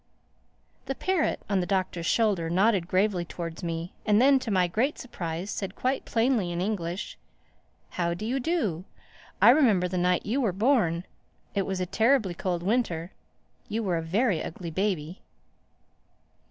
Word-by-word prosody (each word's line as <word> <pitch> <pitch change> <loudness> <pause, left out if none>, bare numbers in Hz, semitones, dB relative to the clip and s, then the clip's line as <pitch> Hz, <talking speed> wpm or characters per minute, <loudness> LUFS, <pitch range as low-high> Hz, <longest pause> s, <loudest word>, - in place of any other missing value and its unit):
The 270 - -2
parrot, 375 0 0
on 195 -1 +1
the 175 - -2
Doctor's 185 -3 -1
shoulder, 200 -8 +2
nodded 190 0 +2
gravely 185 -1 +1
towards 170 0 -6
me 170 0 -4
and 210 -1 +3
then, 270 +2 +5
to 250 - -5
my 185 -3 +3
great 235 - 0
surprise, 180 -5 -5
said 195 -1 -4
quite 260 +1 -1
plainly 225 -6 +1
in 170 - -3
English, 180 -1 -3 0.7
"How 170 -1 -1
do 215 - -6
you 255 +4 0
do? 230 - -1 0.6
I 230 - +10
remember 225 -11 +4
the 180 0 -2
night 180 0 +1
you 245 +7 0
were 215 -7 +1
born. 190 -6 +2 0.5
It 195 -2 -1
was 190 -1 -2
a 180 - 0
terribly 220 0 +2
cold 175 -1 -2
winter. 185 -5 0 0.6
You 225 +2 -1
were 180 -4 0
a - - -1
very 190 +3 +1
ugly 170 0 -6
baby." 185 -2 -2
190 Hz, 160 wpm, -27 LUFS, 175-225 Hz, 0.7 s, I